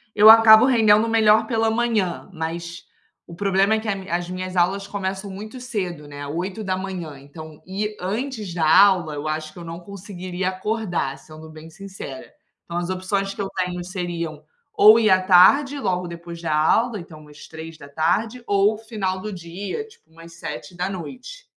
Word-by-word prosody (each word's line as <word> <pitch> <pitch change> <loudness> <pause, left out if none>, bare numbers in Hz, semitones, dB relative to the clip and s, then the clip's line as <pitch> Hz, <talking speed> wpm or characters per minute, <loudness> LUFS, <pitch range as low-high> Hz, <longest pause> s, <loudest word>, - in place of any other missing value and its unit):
Eu 210 +1 +8
acabo 225 +1 +9
rendendo 220 -4 +4
melhor 220 -1 +4
pela 225 -1 +1
manhã, 225 -7 -1
mas 170 0 -6 0.4
o 170 - -11
problema 195 +2 +2
é 220 - +2
que 220 - -8
a 200 - +1
m 195 -1 -8
a 170 - 0
as 175 0 -7
minhas 185 0 -5
aulas 190 +3 +1
começam 195 0 -4
muito 215 +6 -8
cedo, 185 - -5
né, 145 0 -8
8h, 185 -1 -4
então 155 +2 -12
ir 210 +3 -4
antes 215 +1 -4
da 170 -2 -1 0.2
aula 175 -6 +1
eu 145 +1 -5
acho 155 0 -4
que - - -12
não 165 0 -7
conseguiria 185 -1 -5
acordar, 185 -8 -3
sendo 155 +3 -13
bem 155 0 -12
sincera. 190 -7 -9 0.3
Então 170 - -6
as 175 +1 -2
opções 195 +1 -2
que - - -6
eu 195 - -3
tenho 180 -1 -2
seriam 170 -4 -5 0.3
ou 215 +2 +7
ir 215 - +3
à 185 -1 +5
tarde 195 +11 +5
logo 180 -7 -1
depois 170 0 -9
da 160 -3 -1
aula, 215 +8 +2
então 155 -4 -12
às 150 0 -13
15h 160 - -3
ou 205 +1 +2
final 210 -4 -3
do 215 +2 -6
dia 185 - -6
tipo 160 - -23
umas 165 +1 -14
19h. 180 - -7
185 Hz, 170 wpm, -22 LUFS, 170-210 Hz, 0.4 s, acabo